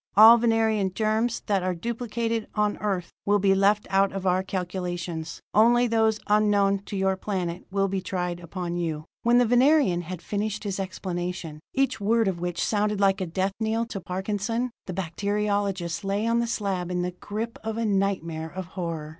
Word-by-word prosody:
All 225 +2 +10
Venerian 220 -4 +2
germs 220 +2 0
that 200 -3 +1
are 185 0 -1
duplicated 230 +2 -2
on 210 -1 +1
Earth 190 -5 -2
will 205 0 +3
be 195 -1 +3
left 200 +2 +3
out 195 0 +3
of 195 -1 -5
our 185 0 +3
calculations. 175 -3 -4
Only 240 +3 +5
those 220 -2 +2
unknown 205 -1 +3
to 200 - -5
your 190 0 +2
planet 185 -3 -3
will 195 0 +1
be 195 0 -2
tried 180 -2 -3
upon 175 0 -4
you." 160 -3 -3 0.2
When 235 +1 +4
the 245 - +5
Venerian 245 - +4
had 175 0 -7
finished 210 +2 -2
his 200 -2 -3
explanation, 180 -4 -4 0.2
each 270 -5 +1
word 225 +2 +2
of 185 -3 -1
which 175 0 -3
had - - +1
sounded 210 -1 0
like 195 0 +3
a 185 - -1
death 190 +3 -1
knell 225 +1 0
to 195 - -5
Parkinson, 205 +6 -2 0.2
the 185 - -4
bacteriologist 195 -1 -1
lay 200 +2 -1
on 230 0 +2
the 235 - 0
slab 195 -6 -2
in 180 -1 -1
the 180 - -2
grip 215 +5 -5
of 220 0 -3
a 230 - 0
nightmare 190 -6 -1
of 185 +2 -6
horror. 165 -5 -4
195 Hz, 185 wpm, -26 LUFS, 180-220 Hz, 0.2 s, All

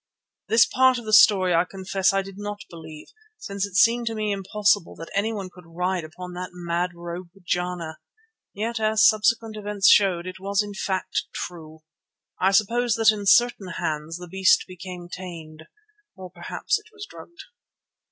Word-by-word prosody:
This 225 +1 +5
part 260 0 +3
of 240 - -8
the 215 - -3
story 195 -4 +6
I 165 0 +4
confess 190 0 -1
I 195 0 0
did 195 +1 -11
not 205 0 -6
believe, 160 -2 -11 0.3
since 200 - -4
it 190 - -14
seemed 230 +4 +4
to 225 - -2
me 215 -1 -1
impossible 200 -1 0
that 165 - -10
anyone 200 -2 -2
could 180 -2 -16
ride 180 0 -1
upon 180 +3 -9
that 180 +1 -6
mad 175 0 -2
rogue, 170 +1 -7
Jana. 180 -2 -3 0.5
Yet, 225 +3 -3
as 215 0 +4
subsequent 220 0 +1
events 205 -1 0
showed, 185 -4 +3
it 185 0 -7
was 200 +2 0
in 205 -1 -8
fact 190 -1 -2
true. 160 -2 -8 0.6
I 190 - +3
suppose 225 +4 +2
that 225 -1 +5
in 205 -2 -5
certain 240 -2 +4
hands 155 +1 -3
the 180 0 -10
beast 190 +2 +3
became 180 -1 -9
tame. 170 -4 -9 0.6
Or 185 -2 -10
perhaps 175 -1 -2
it - - -21
was 420 -1 -9
drugged. 345 - -13
190 Hz, 170 wpm, -24 LUFS, 175-215 Hz, 0.6 s, story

